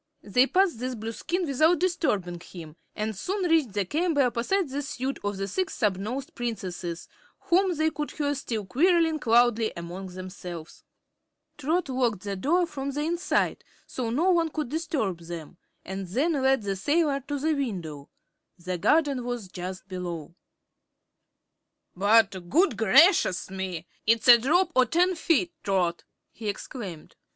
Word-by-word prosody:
They 250 +6 +3
passed 365 - +2
this 255 +1 -3
Blueskin 230 - -3
without 310 +4 +3
disturbing 210 - 0
him 165 -3 -11 0.2
and 215 0 -2
soon 370 - -2
reached 315 - +2
the 200 -1 0
chamber 310 - +1
opposite 255 +10 0
the 280 +2 -3
suite 270 -1 -4
of 205 -1 -2
the 195 0 -3
Six 370 - -2
Snubnosed 215 +6 -2
Princesses, 185 -7 -5 0.3
whom 370 +1 +2
they 315 +1 +1
could 300 -1 -4
hear 290 -1 -1
still 230 -6 -4
quarreling 325 - +3
loudly 235 -1 +3
among 175 +3 -6
themselves. 180 -3 -9 0.7
Trot 315 +5 0
locked 245 -7 0
the 200 -1 -3
door 335 - +2
from 280 -4 -5
the 285 +2 -3
inside, 340 +3 0 0.2
so 245 -3 -4
no 320 +11 +2
one 335 -2 +2
could 305 -4 -4
disturb 300 - -2
them, 170 0 -8 0.3
and 190 0 -5
then 275 - +1
led 265 -4 +2
the 200 -1 -2
sailor 290 - +1
to 290 0 -2
the 310 +3 +1
window. 175 - -4 0.5
The 180 0 -4
garden 285 - +2
was 240 -5 -4
just 185 +1 -7
below. 175 -4 -6 1.6
"But 195 -2 +3
good 355 +8 +3
gracious 225 - +4
me! 185 -3 -4 0.2
It's 230 +3 +3
a 240 -1 +10
drop 340 +9 +2
o' 255 -1 +5
ten 355 +8 +2
feet, 340 0 +1
Trot," 180 -3 0 0.3
he 220 -2 -5
exclaimed. 195 -5 -7
245 Hz, 150 wpm, -27 LUFS, 190-310 Hz, 1.6 s, a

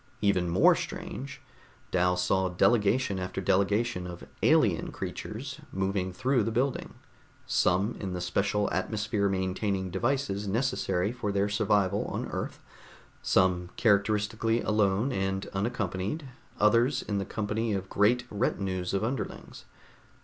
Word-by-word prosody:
Even 95 -4 +2
more 85 +3 +6
strange, 135 0 -6 0.5
Dal 90 0 +2
saw 95 +1 +1
delegation 105 +3 +2
after 90 +1 -4
delegation 100 +1 +1
of 90 -1 -8 0.2
alien - - +3
creatures - - -6
moving 95 -1 -1
through 130 +6 +1
the 110 - 0
building, 125 +4 -1 0.5
some 95 +6 +2
in 95 -3 -4
the 90 - -3
special 100 +3 0
atmosphere 105 +1 0
maintaining 95 0 -1
devices 120 0 -1
necessary 105 -3 0
for 120 -4 -3
their 100 +1 +1
survival 100 -1 +1
on - - -3
Earth, - - -4 0.6
some 90 -1 +2
characteristically 110 +2 +2
alone 105 +3 +2
and 95 -2 -1
unaccompanied, 100 - -2 0.3
others 120 +6 +3
in 100 -2 -2
the - - -1
company 110 +2 -2
of 95 -2 -2
great 115 +6 +2
retinues 95 -4 -1
of 100 - 0
underlings. 130 +4 -4
100 Hz, 125 wpm, -29 LUFS, 95-115 Hz, 0.6 s, more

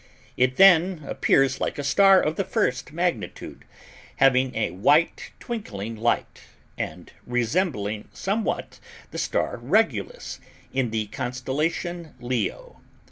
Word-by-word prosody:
It 130 0 +2
then 180 -1 +5
appears 135 -1 +2
like - - -2
a 145 - -3
star 195 +6 +6
of 155 +1 -1
the 195 - 0
first 205 -2 -1
magnitude, 160 - -3 0.5
having 130 -1 +3
a 110 -5 0
white 145 - +2
twinkling 115 - -5
light, 115 +2 -1 0.3
and - - -6 0.2
resembling 120 - -1
somewhat 210 +3 -2 0.3
the - - -5
star - - -1
Regulus - - 0 0.3
in 130 -3 0
the 110 -1 -1
constellation 145 - -3
Leo. 120 -3 -3
135 Hz, 115 wpm, -25 LUFS, 120-175 Hz, 0.5 s, star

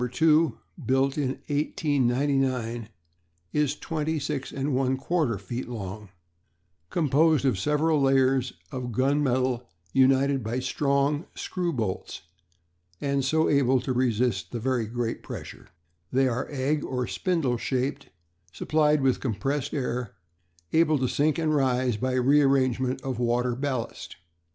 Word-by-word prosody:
2_, 150 +2 +3 0.3
built 135 +3 +2
in 145 -3 0 0.2
1899, 135 -5 0 0.6
is 150 -1 +1
26 150 -3 -3
1/4 135 - 0
feet 120 +6 -5
long, 105 -3 -6 0.8
composed 155 -1 +3
of 125 -8 +2
several 150 +5 +2
layers 135 -1 +3 0.2
of 125 -1 -4
gun 135 +5 +2
metal 130 -4 0 0.2
united 135 0 +3
by 115 +3 -2
strong 140 +3 0
screw 180 -2 -2
bolts, 110 - -4 0.8
and 140 -1 0
so 160 +4 +2
able 135 -2 +3
to 130 +1 -2
resist 120 -7 0
very 120 -1 -1
great 115 0 -3
pressure. - - -9 0.4
They 135 0 +3
are 125 +1 -2
egg 145 +2 -1
or 125 -1 -2
spindle 160 -9 0
shaped, 135 +3 -2 0.4
supplied 150 - +2
with 130 -1 +2
compressed 135 +4 -2
air, 125 -4 -3 0.6
able 160 -2 +4
to 130 -1 0
sink 145 +5 +1
and 160 -2 +1
rise 130 -4 +1
by 130 +3 -1
rearrangement 130 -1 +2
of 130 -3 -3
water 120 0 +1
ballast. 130 -3 -4
130 Hz, 120 wpm, -26 LUFS, 125-145 Hz, 0.8 s, able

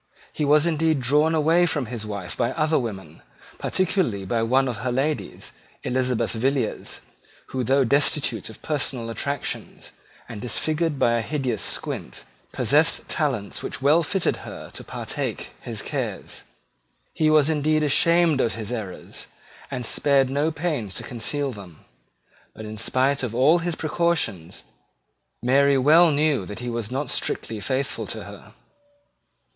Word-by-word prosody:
He 150 - -1
was 150 +2 +5
indeed 160 -2 +2
drawn 150 +6 +3
away 165 +3 +4
from 145 -5 -1
his 110 -2 -5
wife 100 -4 -5
by 120 - 0
other 155 0 +2
women, 95 - -6 0.4
particularly 165 - 0
by 115 +4 0
one 130 +4 +3
of 120 -4 -3
her 125 +3 -2
ladies, 140 +5 -2 0.3
Elizabeth 125 -2 0
Villiers, 130 +4 -1 0.5
who, 130 -1 -2
though 135 +3 +3
destitute 140 -4 +2
of 110 - -13
personal 135 -6 -2
attractions, 140 +5 -4 0.4
and 105 -3 -7
disfigured 155 +5 -1
by 120 -2 +3
a - - -1
hideous 130 -4 -2
squint, 60 - -4 0.3
possessed - - +2
talents - - -1
which - - -5
well 150 +4 +5
fitted 180 +3 0
her - - -9
to - - -7
partake - - -4
his - - -5
cares. - - -4 0.7
He 155 -1 +2
was 155 -2 +5
indeed 155 0 +2
ashamed 165 0 +4
of 115 - 0
his 110 0 -5
errors, 105 -7 -6 0.4
and 125 -3 -4
spared 135 +1 +2
no 145 +4 +1
pains 145 - -3
to - - -5
conceal 135 +4 -2
them: 95 -8 -12 0.7
but, 110 - -8
in 110 0 -7
spite 130 +4 +1
of 120 -3 -3
all 145 +8 +5
his 170 -1 -2
precautions, 155 - -1 0.8
Mary 140 +2 +4
well 160 +6 +6
knew 145 -5 +2
that 105 - -7
he 120 0 -4
was 115 -3 -3
not 135 +1 -2
strictly 110 -2 -1
faithful 135 +4 -2
to - - -5
her. - - -12
135 Hz, 150 wpm, -24 LUFS, 115-155 Hz, 0.8 s, well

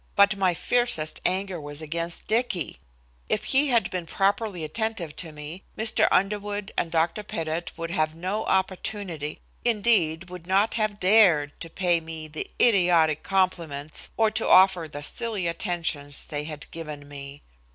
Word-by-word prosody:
But 200 +1 +5
my 190 -3 +2
fiercest 210 -6 0
anger 185 -1 -2
was 145 0 -8
against 165 +2 -4
Dicky. 220 - 0 0.5
If - - 0
he 275 +2 +3
had 235 -4 +2
been 180 -2 -4
properly 200 -1 0
attentive 180 -1 -3
to 165 -3 -5
me, 150 +4 -8 0.2
Mr. 220 0 +2
Underwood 205 +1 0
and 170 - 0
Dr. 165 +5 +1
Pettit 165 -4 -4
would 165 0 -4
have 155 -3 +1
had - - -17
no 190 +5 -2
opportunity, 190 -4 -2 0.2
indeed 205 -7 +2
would 180 -2 -9
not 195 +4 +3
have 215 -2 -1
dared, 180 -8 +5
to 165 - -7
pay 175 0 +2
me 160 -1 -8
the 155 0 -6
idiotic 175 -8 +4
compliments, 170 -6 0
or 220 -1 +3
to 220 +1 -1
offer 185 -3 +6
the 145 -1 -8
silly 215 +2 -1
attentions 165 -5 -1
they 150 0 -4
had 150 -1 -8
given 150 -3 -7
me. 140 0 -9
175 Hz, 155 wpm, -26 LUFS, 155-205 Hz, 0.5 s, offer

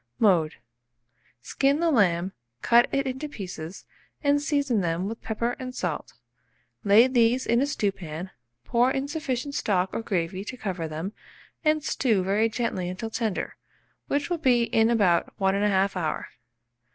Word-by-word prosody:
Mode. 175 -8 +3 0.9
Skin 275 - +1
the 335 -1 +2
lamb, 190 - +2 0.3
cut 240 0 +5
it 275 0 0
into 265 +3 -4
pieces, 180 - -7 0.4
and 285 0 +3
season 285 -7 +1
them 170 +2 -1
with 225 +2 -6
pepper 235 +2 -2
and 255 -1 -6
salt; - - -3 0.7
lay 210 +3 +7
these 250 0 +2
in 235 +2 +2
a 280 - +2
stewpan, 190 - -3 0.3
pour 240 +2 +3
in 270 +1 -1
sufficient 285 -3 -3
stock 190 -7 0
or - - -2
gravy 185 -3 -2
to 255 +5 -7
cover 185 -7 -3
them, 160 +6 -5 0.5
and 305 -1 +2
stew 220 -11 +1
very 205 +4 +2
gently 220 -6 -2
until 190 +5 -5
tender, 220 -4 -2 0.5
which 285 0 0
will 345 - 0
be 245 -5 +3
in 225 -1 +2
about 200 -7 +2
1 190 -1 +2
1/2 200 -1 +2
hour. 165 -4 -2
225 Hz, 150 wpm, -26 LUFS, 190-260 Hz, 0.9 s, lay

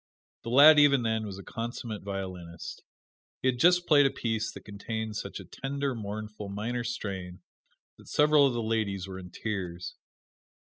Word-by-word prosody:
The - - -6
lad 145 +5 +8
even 140 -3 +5
then 110 -1 -1
was 95 -2 -7
a 100 - -9
consummate 115 -1 -5
violinist. 95 -4 -6 0.6
He 130 - +4
had 125 -1 -1
just 175 +2 +5
played 145 -4 +6
a - - +1
piece 115 -3 -2
that - - -12
contained 110 +1 -5
such - - -5
a - - -10
tender, 140 0 -3
mournful, 105 -1 -6
minor 115 +5 -3
strain 95 -6 -5 0.6
that - - -16
several 150 -1 +5
of 130 - -1
the 120 -1 -2
ladies 105 -4 -1
were 95 0 -7
in 90 -1 -10
tears. 90 -3 -5
110 Hz, 170 wpm, -29 LUFS, 100-130 Hz, 0.6 s, lad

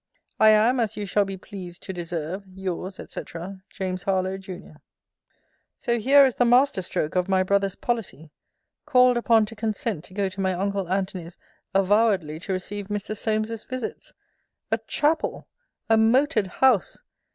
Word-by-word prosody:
I 220 - +7
am, 220 +4 +4
as 225 -2 -1
you 205 - -3
shall 200 +1 +2
be 195 0 -6
pleased 185 -3 -9
to 190 - -5
deserve, 175 +2 -4
Yours, 190 0 -4
&c. - - -6 0.5
JAMES 185 -2 -4
HARLOWE, 190 -1 0
JUN. 185 -5 -10 1.0
So 235 -1 -1
here 275 +5 +6
is 260 - +1
the - - +4
master 245 -2 +4
stroke 155 -3 -3
of 180 +1 +1
my 190 -1 +3
brother's 195 0 +1
policy! 205 - -4 0.6
Called 250 -2 +5
upon 230 -2 +4
to 225 - -10
consent 215 -5 -2
to 185 - -12
go 200 -1 +1
to 190 +1 -5
my 190 -1 +1
uncle 195 0 -2
Antony's 185 -3 -3 0.4
avowedly 195 -5 +2
to 190 +3 -4
receive 195 +2 -4
Mr. 205 +1 -3
Solmes's 215 +1 -2
visits! 255 -2 -6 0.6
A - - +2
chapel! 310 +2 0 0.4
A 225 0 +4
moated 230 -1 +3
house! 255 - +2
200 Hz, 155 wpm, -25 LUFS, 185-225 Hz, 1.0 s, I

